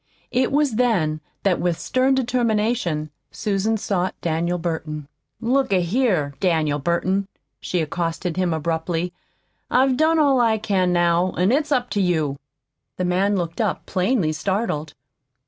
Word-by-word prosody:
It 250 +1 +1
was 285 -5 +1
then 175 -11 +1 0.2
that 190 -3 +2
with 175 -2 0
stern 260 +1 +2
determination 225 - 0 0.2
Susan 215 +1 -1
sought 190 -3 -2
Daniel 170 +2 -1
Burton. 160 -3 -4 0.3
"Look 250 +1 +1
a 185 -2 +3
here, 175 - +1
Daniel 155 -5 +1
Burton," 185 +6 0 0.3
she 180 - -1
accosted 165 +2 -2
him 185 -1 0
abruptly, 165 +2 -2 0.6
"I've 260 0 +3
done 320 +2 +3
all 280 -5 +4
I 225 -2 +3
can 195 -4 +1
now, 175 +1 +2
an' 185 +4 +2
it's 295 +3 +1
up 250 -3 +1
to 205 - +1
you." 155 -6 0 0.6
The 180 - -1
man 190 +3 +2
looked 170 +3 -2
up, 210 -5 -1
plainly 185 -3 +1
startled. 155 -3 -2
185 Hz, 145 wpm, -22 LUFS, 165-235 Hz, 0.6 s, all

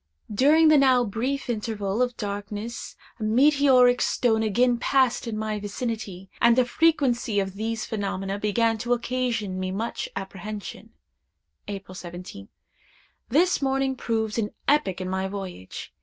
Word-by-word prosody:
During 305 +8 +5
the 305 -2 +6
now 260 -2 +5
brief 245 +6 -2
interval 215 -2 -2
of 250 -1 0
darkness 205 +2 -5 0.2
a - - -4
meteoric 255 +1 +5
stone 225 -3 +2
again 240 +3 +2
passed 260 -1 +2
in 220 -2 -3
my 215 -1 -2
vicinity, 205 -3 -5
and 235 0 +6
the 255 0 +4
frequency 250 -7 +2
of 195 -1 -2
these 220 +2 -3
phenomena 195 -2 -3
began 225 +2 +1
to 240 +2 0
occasion 235 -5 -2
me 185 0 -2
much 215 +5 -3
apprehension. 200 +1 -7 0.8
"April 195 -2 -7
17th. 175 - -9 0.8
This 335 +8 +3
morning 270 0 0
proved 225 -2 -1
an 210 -2 -1 0.2
epoch 275 -11 +2
in 185 - -3
my 190 +1 -1
voyage. 190 - -7
225 Hz, 140 wpm, -25 LUFS, 200-250 Hz, 0.8 s, the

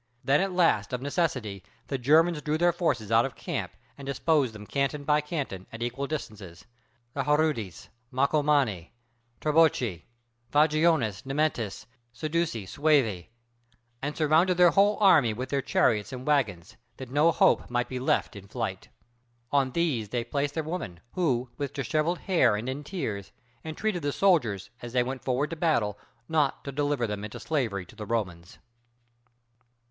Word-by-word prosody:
Then 140 +4 +3
at 195 0 0
last 165 - +2
of 125 - -2
necessity 130 - -2 0.2
the 135 - -3
Germans 155 +5 +4
drew 150 0 -1
their 175 +1 +3
forces 140 - -1
out 115 +1 +5
of 135 -3 -4
camp - - -4 0.3
and 140 - -8
disposed 140 -1 +1
them 105 -1 -10
canton 140 +4 -1
by 150 +1 +3
canton, 140 - -5
at 115 +1 -5
equal 125 +4 -3
distances, 105 - -7 0.5
the 135 -2 -2
Harudes, 150 - 0 0.2
Marcomanni, 140 - +1 0.5
Tribocci, 150 - +2 0.5
Vangiones, 150 - +2
Nemetes, 135 -6 -1 0.3
Sedusii, 155 - -2
Suevi; 130 - +1 0.7
and 145 +2 -4
surrounded 160 +4 +3
their 175 -1 +6
whole 200 +3 +4
army 160 - +5
with 125 +4 -5
their 140 -1 0
chariots 110 -3 +1
and 130 0 -7
wagons, 110 - 0 0.2
that 130 -2 -8
no 150 +4 +4
hope - - +3
might 120 0 0
be 130 - -4
left 130 - 0
in 100 -1 -10
flight. - - -4 0.6
On 140 -2 +2
these 130 -8 -1
they 120 +1 -1
placed 140 +2 -2
their 160 - -1
women, 155 - -5
who, 130 -9 0
with 140 -2 -4
disheveled 155 +7 0
hair 135 - +3
and 110 +4 -4
in 135 +3 -4
tears, 110 - -4 0.3
entreated 175 +4 -2
the 145 0 -1
soldiers, 140 - +1
as 120 0 -8
they 125 -1 +3
went 130 +1 -5
forward 130 +4 0
to - - -3
battle, 120 - 0 0.3
not 155 -4 +1
to 140 - -5
deliver 145 -2 0
them 105 -2 -4
into 105 - -7
slavery 115 - -2
to - - -17
the 105 - -7
Romans. 95 -3 -3
140 Hz, 160 wpm, -27 LUFS, 115-155 Hz, 0.7 s, their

